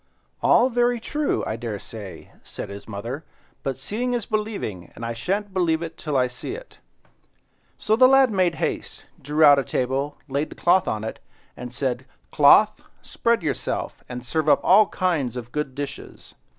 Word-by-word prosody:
"All 250 Hz, +2 st, +4 dB
very 240 Hz, 0 st, +2 dB
true, 295 Hz, +5 st, -1 dB
I 110 Hz, -, -2 dB
dare 115 Hz, -3 st, -4 dB
say," 100 Hz, -1 st, -9 dB
said -, -, -7 dB
his 100 Hz, 0 st, -9 dB
mother, 115 Hz, +8 st, -5 dB, 0.4 s
"but 135 Hz, -3 st, -3 dB
seeing 235 Hz, -, -2 dB
is 235 Hz, -4 st, -2 dB
believing, 210 Hz, -, -3 dB
and 115 Hz, -, -6 dB
I 115 Hz, -, -3 dB
shan't 195 Hz, -, -2 dB
believe 170 Hz, -3 st, +1 dB
it 165 Hz, -1 st, -6 dB
till 150 Hz, -4 st, -2 dB
I 130 Hz, -, +4 dB
see 125 Hz, -, -6 dB
it." -, -, -12 dB, 1.0 s
So 215 Hz, -, +1 dB
the 255 Hz, +3 st, +7 dB
lad 270 Hz, -2 st, +5 dB
made 185 Hz, -4 st, +2 dB
haste, 160 Hz, -, -4 dB, 0.2 s
drew 150 Hz, +3 st, +1 dB
out 145 Hz, -2 st, +8 dB
a -, -, 0 dB
table, 135 Hz, +4 st, -2 dB
laid 140 Hz, +2 st, -1 dB
the -, -, -11 dB
cloth 185 Hz, +2 st, +3 dB
on 110 Hz, -1 st, -2 dB
it, 110 Hz, -, -5 dB, 0.4 s
and 125 Hz, 0 st, -7 dB
said— 130 Hz, 0 st, -3 dB, 0.2 s
"Cloth, 155 Hz, +8 st, +6 dB, 0.2 s
spread 235 Hz, -5 st, 0 dB
yourself, 150 Hz, -4 st, -3 dB
and 125 Hz, -1 st, -6 dB
serve 155 Hz, +3 st, 0 dB
up -, -, +5 dB
all 205 Hz, +2 st, +6 dB
kinds 155 Hz, -, -1 dB
of 120 Hz, -1 st, -7 dB
good 150 Hz, -2 st, -3 dB
dishes." 145 Hz, 0 st, -7 dB
150 Hz, 175 wpm, -24 LUFS, 125-205 Hz, 1.0 s, out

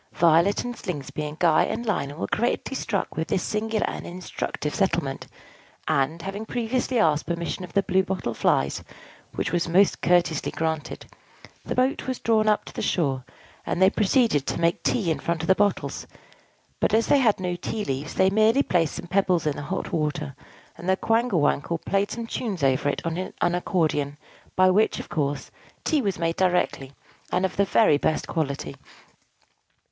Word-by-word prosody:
Violet 170 Hz, +4 st, +4 dB
and 245 Hz, 0 st, -4 dB
Slingsby 155 Hz, -, -5 dB
and 150 Hz, +1 st, -8 dB
Guy 165 Hz, -3 st, +4 dB
and 235 Hz, -, -3 dB
Lionel 145 Hz, -9 st, -2 dB
were -, -, 0 dB
greatly 240 Hz, +4 st, 0 dB
struck 210 Hz, -6 st, -2 dB
with 160 Hz, 0 st, -2 dB
this 180 Hz, -, 0 dB
singular 215 Hz, 0 st, -1 dB
and -, -, -5 dB
instructive 175 Hz, -4 st, -4 dB
settlement; 170 Hz, -8 st, -1 dB, 0.6 s
and, 150 Hz, +5 st, 0 dB
having 195 Hz, +2 st, -4 dB
previously 245 Hz, +2 st, -1 dB
asked 155 Hz, -8 st, +2 dB
permission 170 Hz, +2 st, -3 dB
of 180 Hz, -, -9 dB
the 200 Hz, -, +3 dB
Blue 190 Hz, 0 st, +2 dB
Bottle 185 Hz, -10 st, -3 dB
Flies 70 Hz, -9 st, +1 dB, 0.5 s
(which -, -, -2 dB
was 175 Hz, 0 st, 0 dB
most 190 Hz, +4 st, +3 dB
courteously 175 Hz, -3 st, +2 dB
granted), 160 Hz, -2 st, -3 dB, 0.6 s
the -, -, -4 dB
boat 255 Hz, +2 st, +1 dB
was 260 Hz, -1 st, -2 dB
drawn 220 Hz, -1 st, +2 dB
up 210 Hz, -1 st, +2 dB
to -, -, -11 dB
the -, -, -4 dB
shore, 135 Hz, -7 st, 0 dB, 0.4 s
and -, -, -2 dB
they 190 Hz, +1 st, +6 dB
proceeded 210 Hz, -, +2 dB
to -, -, -2 dB
make 170 Hz, 0 st, +1 dB
tea 195 Hz, -9 st, +1 dB
in 160 Hz, -, -1 dB
front 170 Hz, -1 st, -2 dB
of -, -, -3 dB
the 190 Hz, -, +6 dB
bottles: 205 Hz, +1 st, -1 dB, 0.7 s
but -, -, +2 dB
as 225 Hz, -, +3 dB
they 285 Hz, -, +4 dB
had 225 Hz, -7 st, +3 dB
no 180 Hz, -1 st, -2 dB
tea 210 Hz, +4 st, -4 dB
leaves, 135 Hz, +3 st, -4 dB
they 190 Hz, 0 st, +4 dB
merely 220 Hz, +6 st, +4 dB
placed 165 Hz, -4 st, +1 dB
some -, -, -6 dB
pebbles 185 Hz, -1 st, +1 dB
in 150 Hz, -2 st, 0 dB
the -, -, -5 dB
hot 185 Hz, +5 st, -4 dB
water; 150 Hz, -3 st, -2 dB, 0.4 s
and 175 Hz, -, -4 dB
the 190 Hz, -, +3 dB
Quangle 225 Hz, -6 st, +1 dB
Wangle 145 Hz, +3 st, +1 dB
played 200 Hz, +4 st, 0 dB
some 235 Hz, +1 st, -4 dB
tunes 210 Hz, -, -4 dB
over 135 Hz, +1 st, +2 dB
it 145 Hz, -, -3 dB
on 165 Hz, 0 st, -2 dB, 0.2 s
an 175 Hz, -, +2 dB
accordion, 155 Hz, -6 st, 0 dB, 0.4 s
by 185 Hz, 0 st, +5 dB
which, 205 Hz, +4 st, +3 dB
of -, -, -8 dB
course, 145 Hz, -2 st, -2 dB, 0.3 s
tea 310 Hz, -3 st, +2 dB
was 200 Hz, -6 st, -1 dB
made 165 Hz, 0 st, -1 dB
directly, 180 Hz, -7 st, +1 dB, 0.4 s
and 180 Hz, +1 st, +2 dB
of 190 Hz, -, -3 dB
the 200 Hz, -, +3 dB
very 195 Hz, -9 st, +4 dB
best 155 Hz, -, 0 dB
quality. 145 Hz, -4 st, -3 dB
180 Hz, 185 wpm, -25 LUFS, 155-210 Hz, 0.7 s, they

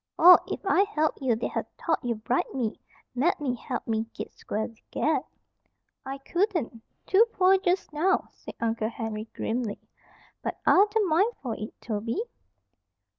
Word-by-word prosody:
"Or, 360 Hz, +2 st, +10 dB
if -, -, -5 dB
I 385 Hz, 0 st, +4 dB
helped 315 Hz, -9 st, 0 dB
you, 250 Hz, -4 st, +2 dB
they'd 225 Hz, -, -3 dB
ha' -, -, -1 dB, 0.2 s
thought 325 Hz, -3 st, -1 dB
you'd 235 Hz, -3 st, -3 dB
bribed 250 Hz, +3 st, 0 dB
me 235 Hz, -4 st, -2 dB, 0.3 s
mebbe 270 Hz, -1 st, +1 dB
helped -, -, -5 dB
me 225 Hz, 0 st, 0 dB
git -, -, -6 dB
square 215 Hz, -, -3 dB
with 230 Hz, -1 st, -17 dB
Ged." -, -, +1 dB, 0.8 s
"I 270 Hz, +1 st, -5 dB
couldn't. 335 Hz, -, -1 dB, 0.2 s
Too 390 Hz, +4 st, +6 dB
poor 375 Hz, +1 st, +5 dB
just 365 Hz, -4 st, 0 dB
now," 360 Hz, +6 st, +1 dB
said -, -, -11 dB
Uncle 225 Hz, -1 st, 0 dB
Henry, 220 Hz, -2 st, -4 dB
grimly. 225 Hz, -2 st, -2 dB, 0.6 s
"But -, -, -3 dB
I'd 400 Hz, +3 st, +6 dB
the 435 Hz, -1 st, +2 dB
mind 365 Hz, +8 st, +3 dB
for 240 Hz, -4 st, -2 dB
it, 215 Hz, -, -8 dB
Toby." 230 Hz, -, -2 dB
265 Hz, 160 wpm, -27 LUFS, 225-365 Hz, 0.8 s, Or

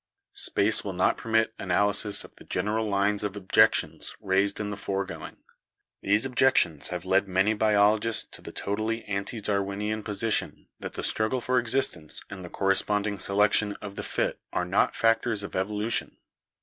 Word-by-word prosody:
Space 105 Hz, +2 st, +2 dB
will 100 Hz, -, -4 dB
not 90 Hz, -, +2 dB
permit 110 Hz, 0 st, 0 dB
analysis 100 Hz, +3 st, +2 dB
of -, -, -16 dB
the -, -, -14 dB
general 110 Hz, +1 st, -2 dB
lines 100 Hz, +1 st, +1 dB
of 105 Hz, -1 st, -3 dB
objections 95 Hz, -2 st, +3 dB
raised 95 Hz, +1 st, 0 dB
in 105 Hz, -1 st, -3 dB
the -, -, -4 dB
foregoing. 100 Hz, -1 st, -5 dB, 0.6 s
These 105 Hz, +5 st, +2 dB
objections 125 Hz, -, +2 dB
have 90 Hz, 0 st, -5 dB
led 95 Hz, +1 st, +2 dB
many 95 Hz, +3 st, +2 dB
biologists 105 Hz, +1 st, +2 dB
to -, -, -9 dB
the -, -, -9 dB
totally 110 Hz, +3 st, -3 dB
ante 100 Hz, +3 st, -3 dB
Darwinian 105 Hz, +1 st, -2 dB
position 105 Hz, +1 st, -1 dB
that -, -, -7 dB
the -, -, -5 dB
struggle 110 Hz, +4 st, -1 dB
for 125 Hz, +1 st, +1 dB
existence 115 Hz, -, -1 dB
and 95 Hz, -2 st, -8 dB
the 90 Hz, -, -8 dB
corresponding 100 Hz, +2 st, +1 dB
selection 105 Hz, +1 st, +1 dB
of 100 Hz, -1 st, -9 dB
the -, -, -4 dB
fit -, -, -2 dB
are 90 Hz, -, -1 dB
not 90 Hz, +3 st, +1 dB
factors 115 Hz, -2 st, +1 dB
of 100 Hz, -, -7 dB
evolution. 105 Hz, +4 st, -1 dB
105 Hz, 160 wpm, -27 LUFS, 100-110 Hz, 0.6 s, objections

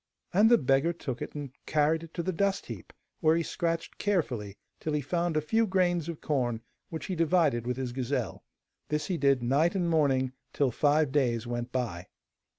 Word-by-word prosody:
And 210 Hz, +5 st, +6 dB
the 240 Hz, -, +7 dB
beggar 135 Hz, +4 st, +2 dB
took 130 Hz, -7 st, -5 dB
it -, -, -6 dB
and 145 Hz, -3 st, -5 dB, 0.2 s
carried 155 Hz, +1 st, +2 dB
it 165 Hz, -1 st, -11 dB
to 170 Hz, -, -2 dB
the 185 Hz, -, -1 dB
dust 195 Hz, +3 st, 0 dB
heap, -, -, -8 dB, 0.3 s
where 160 Hz, -1 st, +4 dB
he 170 Hz, -, 0 dB
scratched 165 Hz, 0 st, -2 dB
carefully 125 Hz, -, -1 dB, 0.2 s
till 155 Hz, -, -3 dB
he 150 Hz, -, +1 dB
found 170 Hz, +3 st, 0 dB
a -, -, +2 dB
few 220 Hz, +9 st, +2 dB
grains 175 Hz, -3 st, +1 dB
of 165 Hz, -, -6 dB
corn, 120 Hz, -6 st, 0 dB, 0.3 s
which 160 Hz, -, -5 dB
he 190 Hz, -, -3 dB
divided 160 Hz, -8 st, +2 dB
with 125 Hz, 0 st, -1 dB
his 130 Hz, -2 st, -3 dB
gazelle. 130 Hz, +2 st, -2 dB, 0.5 s
This 150 Hz, 0 st, 0 dB
he 180 Hz, -, -1 dB
did 140 Hz, -3 st, +3 dB
night 145 Hz, +9 st, +2 dB
and 180 Hz, -3 st, +1 dB
morning, 135 Hz, -5 st, +2 dB, 0.2 s
till 140 Hz, -3 st, +2 dB
five 150 Hz, +2 st, +2 dB
days 120 Hz, -5 st, +1 dB
went 120 Hz, +1 st, -4 dB
by. 105 Hz, -9 st, -3 dB
150 Hz, 195 wpm, -29 LUFS, 130-170 Hz, 0.5 s, the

